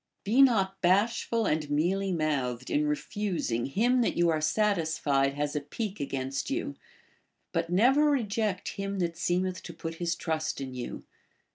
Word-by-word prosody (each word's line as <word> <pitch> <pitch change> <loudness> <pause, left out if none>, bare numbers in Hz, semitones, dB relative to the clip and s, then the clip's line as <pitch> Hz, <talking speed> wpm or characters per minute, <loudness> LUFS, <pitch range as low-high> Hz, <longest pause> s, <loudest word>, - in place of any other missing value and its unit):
* - - -52
Be 225 +7 +4
not 195 -7 +3
bashful 220 +5 +2
and 150 -4 0
mealy 185 +7 +1
mouthed 135 -7 -1
in 150 +1 +2
refusing 150 - -2
him 245 - +2
that 235 - 0
you 170 0 +4
are 155 -1 +1
satisfied 155 -7 +1
has 145 +1 -2
a 150 - 0
pique 200 +8 -5
against 135 -1 -3
you; - - -2 0.8
but 165 0 -1
never 260 +11 +4
reject 215 -7 0
him 195 0 -4
that 170 -2 -1
seemeth 180 +2 -1
to 170 - -9
put 165 0 -6
his 170 0 0
trust 160 -2 -2
in 135 -1 -5
you. 125 -1 -6
175 Hz, 160 wpm, -29 LUFS, 150-205 Hz, 0.8 s, Be